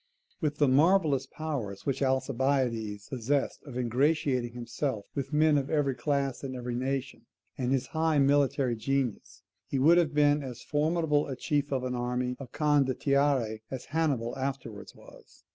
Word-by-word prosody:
With 150 -2 -1
the 145 - +4
marvellous 145 -1 +3
powers 130 -13 -5
which 135 -1 -1
Alcibiades 130 -5 0
possessed 135 +2 -1
of 130 -3 -7
ingratiating 125 0 +1
himself 120 -1 -3
with 140 0 -4
men 150 -1 +4
of 140 - -5
every 145 -3 +1
class 140 +1 -1
and 130 -1 -4
every 125 -1 -4
nation, 135 +2 -3 0.3
and 125 -1 -2
his 135 -2 +1
high 160 -1 +2
military 140 -2 +3
genius, 130 0 -2 0.2
he 140 - -2
would 165 +6 +6
have 155 -4 0
been 145 0 +4
as 125 -4 -7
formidable 150 0 +1
a 135 - -4
chief 145 +2 -1
of 130 -2 0
an 130 0 -2
army 125 +1 -2
of 135 -4 -9
CONDOTTIERI 140 -5 +1
as 130 -2 -6
Hannibal 140 -8 0
afterwards 130 -6 -5
was. - - -17
135 Hz, 155 wpm, -29 LUFS, 125-145 Hz, 0.3 s, would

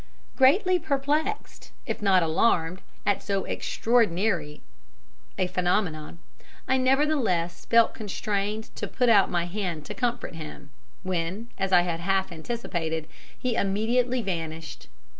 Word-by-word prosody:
"Greatly 360 +8 +4
perplexed, 300 +6 -2
if - - -4
not 190 -3 +4
alarmed, 165 +1 +1 0.2
at 205 -1 +2
so 195 -1 -1
extraordinary 195 -9 0 0.7
a 185 - +2
phenomenon, 180 -3 -1 0.5
I 260 - +3
nevertheless 255 - +1
felt 230 0 +4
constrained 210 +1 -3
to - - -3
put 250 -1 +1
out 205 -4 +6
my 175 -1 0
hand 175 -5 -4
to - - -6
comfort 240 -5 -2
him 155 -2 -9 0.3
when, 185 +5 -3
as 195 0 -1
I 180 -1 +7
had 170 -2 -2
half 190 +2 0
anticipated, 165 -4 -3 0.3
he 250 -1 -1
immediately 235 +5 +1
vanished. 165 -4 -5
195 Hz, 120 wpm, -26 LUFS, 170-240 Hz, 0.7 s, I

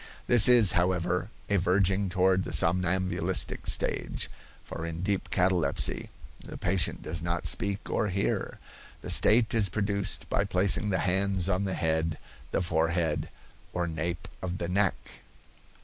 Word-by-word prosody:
This 120 -4 +7
is, 120 -6 +6
however, 90 +1 -1 0.2
a 100 - +1
verging 95 +2 +1
toward 95 0 +1
the - - -7
somnambulistic 90 +1 0
stage, - - -1 0.3
for - - -8
in 85 +1 -5
deep 100 0 -2
catalepsy 90 -2 +1 0.3
the - - -8
patient 90 0 0
does 85 - -4
not 85 +1 -3
speak 100 -1 -1
or - - -1
hear. 100 0 -2 0.4
The - - -3
state 115 0 +5
is 110 -5 +3
produced 100 +1 -2
by 100 - 0
placing 100 +1 +1
the 95 - 0
hands 95 0 0
on 95 +1 0
the 95 - -3
head, 80 0 -1 0.3
the - - -1
forehead, 80 -2 -1 0.4
or 90 -1 -1
nape 85 +1 -4
of 90 0 -4
the 85 - -4
neck. 95 +1 +1
90 Hz, 145 wpm, -27 LUFS, 85-100 Hz, 0.4 s, This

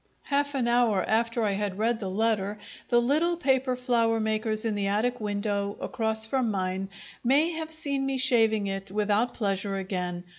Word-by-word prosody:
Half 285 0 0
an 250 -3 0
hour 235 -5 +2
after 230 +1 +1
I 210 - +2
had 200 -1 -2
read 225 +2 +1
the 195 -4 -4
letter, 210 0 0 0.3
the 240 - +5
little 310 +8 +2
paper 265 -4 +1
flower 235 -3 +1
makers 215 0 -1
in 225 - 0
the 200 -1 -1
attic 230 +5 0
window 205 -1 -2
across 220 -1 -2
from 250 0 0
mine 190 -1 -2 0.3
may 285 +7 +4
have 320 -1 -4
seen 280 -4 -2
me 270 -1 -1
shaving 225 -5 +3
it 195 0 -4
without 210 +4 0
pleasure 200 -2 -1
again. 180 -2 -3
220 Hz, 175 wpm, -27 LUFS, 200-250 Hz, 0.3 s, the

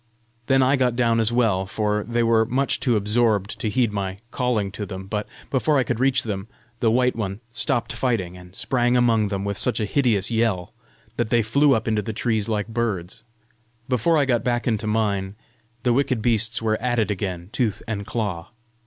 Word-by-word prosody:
Then 135 -1 +4
I 135 +2 +3
got 125 -2 +1
down 115 -2 +2
as 110 0 +2
well, 110 -6 +1
for 105 +1 -1
they 120 +2 0
were 115 -1 +4
much 130 +4 0
too 120 -3 +1
absorbed 105 -1 +1
to 110 - -1
heed 115 0 +1
my 95 -2 -3
calling 115 -6 0
to 105 - -5
them; 95 -1 -7
but 105 +1 -3 0.2
before 145 +2 +2
I 130 - +3
could 120 -2 -2
reach 130 0 +2
them, 100 -2 -4 0.3
the 115 - +3
white 125 +2 +2
one 100 -3 -3
stopped 120 -2 -1
fighting, 105 -9 -1
and 90 +1 -14
sprang 120 +1 +1
among 115 -3 +3
them 100 -1 -3
with 100 -1 -2
such 125 - +1
a 110 - 0
hideous 115 -4 +1
yell 110 -6 0 0.4
that - - 0
they 115 0 +3
flew 140 +5 +4
up 110 0 -2
into 110 -1 +1
the 110 +1 -5
trees 110 -1 -1
like 105 -1 -1
birds. 110 -6 -3 0.6
Before 130 +6 +2
I 145 - +3
got 120 -3 +1
back 120 0 0
into 110 -2 0
mine, 100 -3 0 0.5
the 125 - +3
wicked 130 -2 +1
beasts 115 -1 +1
were 110 -1 0
at 120 -1 0
it 110 -2 +1
again 90 -3 -4
tooth 115 -6 -1
and 105 -3 -3
claw. 100 -6 -3
115 Hz, 200 wpm, -23 LUFS, 105-120 Hz, 0.6 s, Then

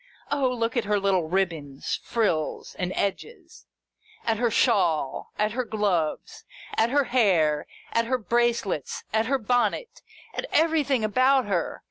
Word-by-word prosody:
O 280 -3 +2
look 230 -1 -2
at 240 - 0
her 210 0 +1
little 190 -5 +1
ribbons, 165 -7 -2
frills, 200 -10 -1
and 180 0 -1
edges, 340 - -4 0.6
at 225 -1 +1
her 240 +1 +1
shawl, 180 - +1
at 210 0 +1
her 255 +3 -1
gloves, 200 -9 -1 0.3
at 225 - +3
her 285 +3 +3
hair, 180 - +2 0.2
at 230 0 +1
her 255 +1 +1
brace 235 0 +1
lets, 155 -8 -4
at 220 +1 +2
her 275 +1 +2
bonnet, 245 - -1 0.3
at - - -4
everything 300 -6 +2
about 255 +4 +3
her 185 -5 -2
225 Hz, 145 wpm, -26 LUFS, 185-255 Hz, 0.6 s, at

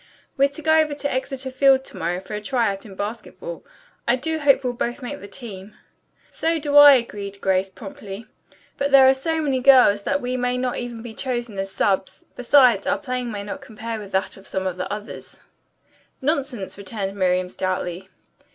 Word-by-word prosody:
"We're 275 0 +3
to 285 +2 -10
go 315 0 +5
over 305 -2 +1
to 285 0 -3
Exeter 260 0 -3
Field 265 0 +4
to - - -12
morrow 175 +2 -2
for 190 +3 -10
a 210 - -3
try 235 -1 +1
out 195 +2 -7
in 195 - -11
basketball. 230 - -6 0.4
I 240 - +4
do 320 +5 -3
hope 275 -2 +4
we'll 250 -1 -1
both 245 +1 -3
make 285 +4 -5
the 200 - -10
team." 205 -2 -9 0.6
"So 330 +1 0
do 290 -2 -2
I," 290 -1 +11
agreed 200 -5 -4
Grace 190 0 +1
promptly. 210 -1 -9 0.5
"But 280 0 +1
there 270 -1 +7
are 265 - +7
so 320 +5 -2
many 275 -4 0
girls 250 -6 +6
that 280 +7 0
we 250 0 -2
may 250 0 0
not 250 0 -1
be - - -4
even 235 -1 -8
chosen 240 -5 -3
as 195 0 -3
subs. 190 -1 -1
Besides, 250 -4 +4
our - - +2
playing 255 -4 -4
may 205 -1 -5
not 280 +8 -6
compare 230 -3 -6
with 205 -2 -10
that 190 +1 -1
of 195 - -15
some 190 0 -3
of 185 -1 -2
the 185 - -4
others." 210 +1 -7 0.8
"Nonsense," 265 - -2
returned 195 0 -4
Miriam 185 -1 +1
stoutly. 185 0 -3
240 Hz, 195 wpm, -22 LUFS, 200-275 Hz, 0.8 s, I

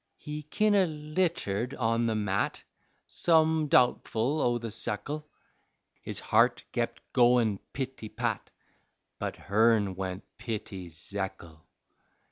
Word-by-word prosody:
He 150 0 -6
kin' 210 +8 +1
o' 195 -2 +5
l'itered 150 - -1
on 115 -1 +1
the 110 - 0
mat, 105 -1 -1 0.4
Some 160 -2 +3
doubtfle 125 +2 +3
o' 120 -1 +2
the 115 -2 -5
sekle, 145 +8 -3 0.7
His - - -5
heart - - +3
kep' - - -1
goin' 120 -4 +4
pity 130 -5 -5
pat, - - -2 0.7
But - - -3
hern 105 -1 +3
went 95 0 -4 0.2
pity 105 -6 -5
Zekle. 85 -1 -6
115 Hz, 110 wpm, -29 LUFS, 105-150 Hz, 0.7 s, o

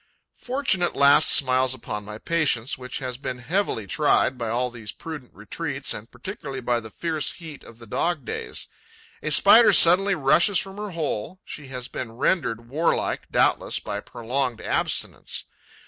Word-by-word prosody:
Fortune 255 -7 0
at 175 - 0
last 140 +2 +5
smiles 130 -1 +3
upon 105 -4 -6
my 105 +1 -7
patience, 140 -5 0
which 125 0 -6
has 130 -3 -5
been 130 -3 -4
heavily 140 - -1
tried 135 +4 +2
by 120 -2 -4
all 125 +2 -1
these 115 -3 -7
prudent 150 -6 -9
retreats - - -3
and - - -8
particularly 135 -1 -7
by 120 -1 0
the 110 -1 -10
fierce 155 +4 -2
heat 160 -5 -10
of 115 - -14
the 115 - -13
dog 155 +5 -1
days. - - -5 0.6
A 155 - -2
Spider 210 +8 +7
suddenly 190 +2 +6
rushes 170 +6 +4
from 195 +1 -3
her 210 0 -5
hole: 165 - -4
she 145 -3 -8
has 125 -2 -6
been 115 -3 -6
rendered 120 -3 0
warlike, 155 +7 -1
doubtless, - - +2
by - - -4
prolonged 125 +1 -3
abstinence. - - -2
135 Hz, 160 wpm, -24 LUFS, 120-170 Hz, 0.6 s, Spider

